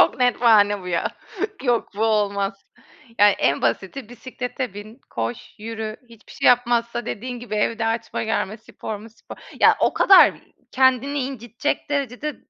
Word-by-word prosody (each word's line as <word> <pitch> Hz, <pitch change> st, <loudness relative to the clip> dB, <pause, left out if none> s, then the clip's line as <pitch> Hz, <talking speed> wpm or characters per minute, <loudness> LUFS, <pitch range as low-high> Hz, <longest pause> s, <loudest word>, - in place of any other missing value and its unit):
Çok -, -, +4 dB
net 245 Hz, -1 st, +2 dB
bahane 205 Hz, -4 st, +4 dB
bu 180 Hz, -, -7 dB
ya. 170 Hz, -2 st, -1 dB, 0.5 s
Yok, 240 Hz, -3 st, +1 dB
bu 220 Hz, -, +1 dB
olmaz. 200 Hz, -2 st, 0 dB, 0.6 s
Yani 205 Hz, 0 st, +7 dB
en 140 Hz, -, +1 dB
basiti 190 Hz, -, -2 dB
bisiklete 250 Hz, 0 st, -6 dB
bin, 215 Hz, +5 st, -10 dB
koş, 115 Hz, +1 st, -5 dB
yürü. 220 Hz, 0 st, -5 dB
Hiçbir 230 Hz, -2 st, -17 dB
şey -, -, 0 dB
yapmazsa 240 Hz, -1 st, +2 dB
dediğin 245 Hz, +2 st, -5 dB
gibi 235 Hz, -3 st, -6 dB
evde 225 Hz, +2 st, 0 dB
açma 225 Hz, 0 st, -2 dB
germe, 215 Hz, -1 st, -2 dB
spor 220 Hz, 0 st, -7 dB
mu, 220 Hz, +3 st, -12 dB
spor. 225 Hz, -, -13 dB, 0.2 s
Ya, -, -, +6 dB
o -, -, +3 dB
kadar 390 Hz, -, +7 dB, 0.4 s
kendini 260 Hz, +2 st, +2 dB
incitecek 255 Hz, +2 st, -3 dB
derecede 280 Hz, +1 st, -2 dB
230 Hz, 155 wpm, -22 LUFS, 205-250 Hz, 0.6 s, Yani